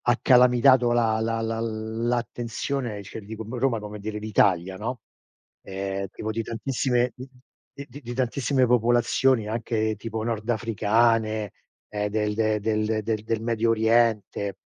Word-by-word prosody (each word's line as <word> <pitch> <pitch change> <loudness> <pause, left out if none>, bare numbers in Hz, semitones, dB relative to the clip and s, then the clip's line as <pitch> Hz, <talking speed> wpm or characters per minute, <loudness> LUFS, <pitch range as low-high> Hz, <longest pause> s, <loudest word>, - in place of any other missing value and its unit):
Ha 120 -1 +3
calamitato 125 0 +5
la 115 -2 +2
la 115 0 -1
l 115 0 -3
l'attenzione, 120 -1 -3
cioè 100 - -8
ti 105 - -13
dico 110 0 -7
mo' 120 +3 -6
Roma 130 -2 +1
come 105 0 -8
dire 105 +1 -5
d'Italia, 95 -4 +1
no, 115 +4 -5 0.6
ehm, 95 0 -4
tipo 110 - -5
di 115 +1 -2
tantissime 120 +2 -1
d 125 - -8 0.6
di 135 +4 -11
di 120 -1 -6
tantissime 130 +1 +1
popolazioni, 120 0 +2
anche 110 -1 -1
tipo 110 +1 -5
nordafricane, 110 -1 +1 0.4
ehm, 105 0 -2
del 105 0 -1
de 110 -1 +1
del 110 0 0
del 110 0 -2
del 110 0 -2
Medio 115 0 +1
Oriente. 110 -3 +1
115 Hz, 145 wpm, -25 LUFS, 110-120 Hz, 0.6 s, calamitato